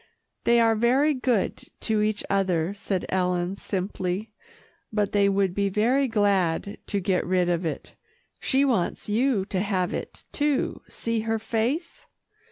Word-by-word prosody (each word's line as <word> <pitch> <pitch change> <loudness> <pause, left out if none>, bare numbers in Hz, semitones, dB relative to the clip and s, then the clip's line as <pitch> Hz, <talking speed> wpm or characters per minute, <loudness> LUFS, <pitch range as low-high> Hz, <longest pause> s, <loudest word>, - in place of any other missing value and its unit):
"They 235 0 +5
are 225 -1 +4
very 255 +7 +3
good 250 -6 0 0.2
to 220 -2 +1
each 210 0 0
other," 185 -3 +1
said 195 -2 -3
Ellen 180 0 0
simply, 190 +1 -3 0.6
"but 210 -2 0
they 200 -1 +3
would 195 -2 +1
be 200 +1 +1
very 245 +8 +2
glad 200 -4 +1
to 200 - 0
get 185 0 +1
rid 180 -1 +1
of 175 0 0
it. 155 - -6 0.5
She 275 +1 +2
wants 230 -10 0
you 220 -1 +1
to 195 -2 -2
have 185 -3 0
it, - - -6
too. 290 -2 0
See 230 -1 -2
her 225 +1 0
face." 235 +9 -2
205 Hz, 150 wpm, -26 LUFS, 185-230 Hz, 0.6 s, They